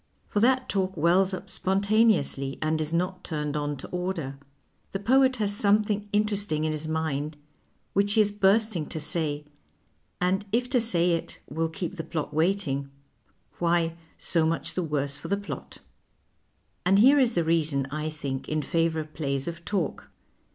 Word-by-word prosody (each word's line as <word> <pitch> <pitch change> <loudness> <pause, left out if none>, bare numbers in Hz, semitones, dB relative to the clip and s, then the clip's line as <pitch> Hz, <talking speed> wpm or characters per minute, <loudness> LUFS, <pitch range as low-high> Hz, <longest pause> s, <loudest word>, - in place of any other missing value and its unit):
For 205 - 0
that 255 +3 +3
talk 190 -2 -1
wells 180 +5 +4
up 185 - -5
spontaneously 195 - +2
and 155 0 0
is 155 0 -2
not 180 +2 -1
turned 150 -2 -3
on 145 -1 -2
to - - -8
order; 180 -7 -3 0.5
the 195 - -1
poet 260 +5 +4
has 205 -3 +1
something 210 0 +2
interesting 205 -7 0
in 155 - 0
his 155 0 -4
mind 155 -1 -2 0.6
which 200 +1 +2
he 220 - +5
is 210 -1 +2
bursting 205 -3 +2
to 160 - -5
say, 150 -2 -1 0.7
and 185 +3 +1
if 245 +3 +1
to 250 -3 +4
say 180 -6 +3
it 165 -1 -2
will 160 +3 -1
keep 175 +3 -5
the 160 - -3
plot 155 -2 -4
waiting, 155 -5 0 0.7
why, 170 -1 +1 0.2
so 165 -2 +1
much 165 +1 -1
the 185 - -1
worse 145 -3 -1
for 145 - -8
the 200 - +1
plot. 205 - -7 1.1
And 190 +2 +4
here 270 +7 +7
is 245 -6 +2
a 170 - +3
reason, 155 -4 +1
I 155 +1 -2
think, 140 -4 -5
in 155 -1 0
favour 165 0 +1
of 155 0 -11
plays 140 -2 -2
of 170 0 -5
talk. 190 -6 -2
170 Hz, 170 wpm, -27 LUFS, 155-200 Hz, 1.1 s, here